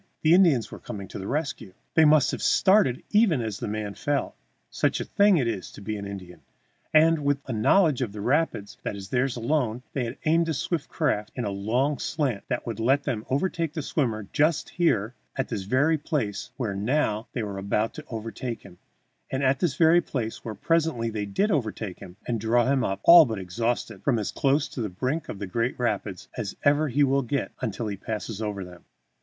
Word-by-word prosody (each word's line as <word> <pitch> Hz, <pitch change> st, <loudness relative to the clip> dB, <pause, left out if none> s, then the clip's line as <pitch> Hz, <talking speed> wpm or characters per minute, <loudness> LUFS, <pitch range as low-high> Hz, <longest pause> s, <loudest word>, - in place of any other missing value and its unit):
The 155 Hz, +1 st, +5 dB
Indians 160 Hz, -, +4 dB
were -, -, -8 dB
coming 100 Hz, -2 st, -7 dB
to -, -, -7 dB
the 95 Hz, -, -6 dB
rescue! 140 Hz, -, -3 dB, 0.2 s
They 160 Hz, -, +6 dB
must 150 Hz, -2 st, +5 dB
have -, -, -4 dB
started 190 Hz, -, +3 dB
even 210 Hz, -, +4 dB
as 110 Hz, -4 st, -3 dB
the 120 Hz, -, -4 dB
man 105 Hz, -1 st, -3 dB
fell, 145 Hz, +3 st, -1 dB, 0.4 s
such -, -, 0 dB
a -, -, -1 dB
thing 200 Hz, -2 st, +4 dB
it 130 Hz, -6 st, +1 dB
is 105 Hz, -5 st, -3 dB
to -, -, -11 dB
be 110 Hz, +1 st, -3 dB
an 100 Hz, -1 st, -5 dB
Indian! 90 Hz, -4 st, -9 dB, 0.5 s
and, 160 Hz, 0 st, +4 dB
with 145 Hz, 0 st, +2 dB
a 130 Hz, -, -4 dB
knowledge 140 Hz, -, +3 dB
of 120 Hz, -5 st, -1 dB
the 105 Hz, -, -8 dB
rapids 125 Hz, -3 st, 0 dB
that -, -, -4 dB
is 95 Hz, -1 st, -8 dB
theirs 130 Hz, 0 st, 0 dB
alone, 125 Hz, -1 st, -1 dB
they 130 Hz, -3 st, -1 dB
had 115 Hz, -, -6 dB
aimed 165 Hz, +1 st, +3 dB
the 160 Hz, -, -1 dB
swift 160 Hz, +1 st, -2 dB
craft 110 Hz, -9 st, -1 dB
in 125 Hz, -, -2 dB
a 100 Hz, -, -2 dB
long 120 Hz, +9 st, 0 dB
slant 135 Hz, -10 st, -2 dB
that 125 Hz, -2 st, -2 dB
would 115 Hz, -3 st, -4 dB
let 135 Hz, +5 st, +2 dB
them 110 Hz, -5 st, -3 dB
overtake 165 Hz, +2 st, -1 dB
the 160 Hz, -3 st, -3 dB
swimmer 115 Hz, -9 st, -1 dB
just 155 Hz, +1 st, +1 dB
here, 125 Hz, -, +1 dB, 0.2 s
at 135 Hz, -1 st, -2 dB
this 95 Hz, -3 st, -3 dB
very 145 Hz, +9 st, +2 dB
place 130 Hz, -, -2 dB
where 115 Hz, -6 st, -2 dB
now 110 Hz, +1 st, 0 dB
they 120 Hz, -, -2 dB
were 100 Hz, -2 st, -5 dB
about 105 Hz, +3 st, 0 dB
to 155 Hz, -, -9 dB
overtake 115 Hz, +1 st, -5 dB
him, 90 Hz, -3 st, -15 dB, 0.5 s
at 135 Hz, 0 st, +1 dB
this 165 Hz, -7 st, 0 dB
very 165 Hz, +3 st, +5 dB
place 115 Hz, -8 st, -4 dB
where 110 Hz, -3 st, -5 dB
presently 155 Hz, -, 0 dB
they 105 Hz, -2 st, -3 dB
did 200 Hz, -, +1 dB
overtake 110 Hz, -, -2 dB
him 90 Hz, 0 st, -11 dB
and 115 Hz, -2 st, -1 dB
draw 115 Hz, +2 st, +3 dB
him 135 Hz, -1 st, +2 dB
up, 95 Hz, -4 st, -2 dB
all 170 Hz, -1 st, +10 dB
but 110 Hz, -3 st, -3 dB
exhausted, 110 Hz, +2 st, -2 dB
from 120 Hz, +3 st, +1 dB
as 105 Hz, -, -2 dB
close 140 Hz, 0 st, +1 dB
to 125 Hz, -, -6 dB
the 110 Hz, -, -2 dB
brink 130 Hz, -, -3 dB
of -, -, -5 dB
the 100 Hz, -, -4 dB
Great 115 Hz, +6 st, -1 dB
Rapids 105 Hz, -6 st, -2 dB
as 105 Hz, -5 st, -4 dB
ever 145 Hz, +2 st, +3 dB
he 145 Hz, +2 st, +2 dB
will 140 Hz, 0 st, +3 dB
get 135 Hz, +2 st, -2 dB
until 115 Hz, -1 st, -3 dB
he 105 Hz, -2 st, -3 dB
passes 110 Hz, +1 st, -5 dB
over 100 Hz, -3 st, -3 dB
them. 90 Hz, -1 st, -13 dB
120 Hz, 215 wpm, -26 LUFS, 105-150 Hz, 0.5 s, all